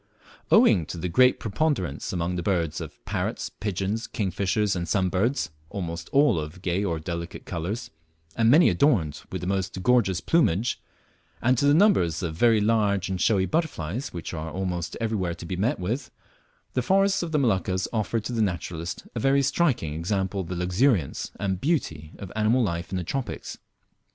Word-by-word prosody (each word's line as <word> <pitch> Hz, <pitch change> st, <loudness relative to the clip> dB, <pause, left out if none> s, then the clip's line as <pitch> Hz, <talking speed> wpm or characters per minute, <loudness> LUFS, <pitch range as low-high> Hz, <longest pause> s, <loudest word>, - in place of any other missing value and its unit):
Owing 80 Hz, -5 st, +5 dB
to -, -, -6 dB
the 90 Hz, +2 st, -3 dB
great 125 Hz, +9 st, +4 dB
preponderance 110 Hz, -, -1 dB
among 90 Hz, 0 st, -1 dB
the 90 Hz, -, -2 dB
birds, 85 Hz, -4 st, -1 dB
of -, -, -10 dB
parrots, -, -, -2 dB
pigeons, 105 Hz, +3 st, -3 dB
kingfishers, 100 Hz, 0 st, 0 dB
and 85 Hz, -1 st, -3 dB
sunbirds, 95 Hz, -, +1 dB, 0.2 s
almost 85 Hz, -4 st, -5 dB
all 140 Hz, -, +4 dB
of 75 Hz, +4 st, -7 dB
gay 90 Hz, +3 st, 0 dB
or 85 Hz, -5 st, -1 dB
delicate 85 Hz, +2 st, -6 dB
colours, 90 Hz, +8 st, -4 dB, 0.4 s
and 115 Hz, -1 st, +3 dB
many 155 Hz, +7 st, +7 dB
adorned 105 Hz, -, +2 dB
with 95 Hz, -, -4 dB
the -, -, -4 dB
most 95 Hz, -1 st, -2 dB
gorgeous 115 Hz, -8 st, +3 dB
plumage, 120 Hz, -, +1 dB, 0.6 s
and 125 Hz, +2 st, +3 dB
to -, -, +2 dB
the 145 Hz, -, +5 dB
numbers 95 Hz, -, +3 dB
of 80 Hz, -2 st, -2 dB
very 115 Hz, +4 st, +4 dB
large 105 Hz, -3 st, +1 dB
and 95 Hz, -1 st, -2 dB
showy 100 Hz, -4 st, +3 dB
butterflies 130 Hz, -, -2 dB
which 85 Hz, 0 st, -6 dB
are 80 Hz, 0 st, -4 dB
almost 90 Hz, 0 st, -3 dB
everywhere 105 Hz, -7 st, -1 dB
to 85 Hz, -, -9 dB
be 90 Hz, -, -3 dB
met 100 Hz, +5 st, 0 dB
with, 120 Hz, +8 st, -3 dB, 0.6 s
the 130 Hz, -, +1 dB
forests 195 Hz, -, +3 dB
of 170 Hz, -2 st, -4 dB
the 155 Hz, -, +2 dB
Moluccas 95 Hz, -, +1 dB
offer 110 Hz, 0 st, 0 dB
to 115 Hz, +3 st, -5 dB
the 115 Hz, -, 0 dB
naturalist 85 Hz, -3 st, -3 dB
a 115 Hz, -, -3 dB
very 135 Hz, +3 st, +3 dB
striking 135 Hz, -, +1 dB
example 95 Hz, +4 st, -1 dB
of 90 Hz, -, -7 dB
the 90 Hz, -, -4 dB
luxuriance 90 Hz, -, +1 dB
and 95 Hz, -2 st, -2 dB
beauty 80 Hz, -, -1 dB
of 95 Hz, -3 st, -8 dB
animal 110 Hz, +4 st, +3 dB
life 85 Hz, -4 st, -2 dB
in 95 Hz, -, -2 dB
the 90 Hz, -, -2 dB
tropics. 130 Hz, +8 st, -4 dB
95 Hz, 175 wpm, -26 LUFS, 85-120 Hz, 0.6 s, many